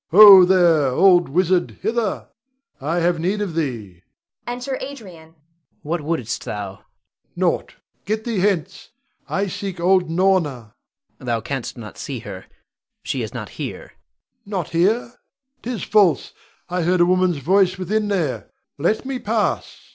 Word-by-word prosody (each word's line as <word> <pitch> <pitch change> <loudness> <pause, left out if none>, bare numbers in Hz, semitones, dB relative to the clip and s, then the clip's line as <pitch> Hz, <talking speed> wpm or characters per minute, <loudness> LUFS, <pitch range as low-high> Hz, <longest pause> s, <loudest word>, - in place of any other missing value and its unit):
Ho, 195 0 +10
there! 175 -6 +4
old 175 +5 +4
wizard, 180 +3 +1
hither! 220 -1 -1 0.5
I 155 +6 -2
have 170 0 +1
need 190 +6 -1
of 200 -5 -3
thee! 115 - -4 0.5
[Enter 250 +2 -4
Adrian. 265 - -4
Adrian. 170 -10 -14 0.5
What 165 +2 -2
wouldst 145 -7 -3
thou? 105 -2 -5
Rod. - - -32 0.5
Nought. - - -1 0.3
Get 215 +2 -2
thee 230 -4 -2
hence! 190 -2 -1 0.4
I 195 - 0
seek 195 -1 -5
old 180 0 +2
Norna. 165 - 0 0.5
Adrian. - - -12
Thou 115 -2 0
canst 135 -2 -5
not 110 -3 -10
see 135 - -5
her; 95 -5 -9 0.6
she - - -3
is - - -5
not - - -7
here. - - -6
Rod. - - -18 0.6
Not 190 -6 -3
here? 210 +8 +1 0.5
'Tis 235 -5 -4
false, 190 - +2 0.3
I 180 +1 -2
heard 175 +1 +2
a - - +6
woman's 185 -2 +2
voice 185 +6 +2
within 210 +4 -1
there. 175 -10 -2 0.3
Let 210 - 0
me 265 -1 -3
pass! 220 -2 -2
180 Hz, 150 wpm, -21 LUFS, 160-200 Hz, 0.6 s, Ho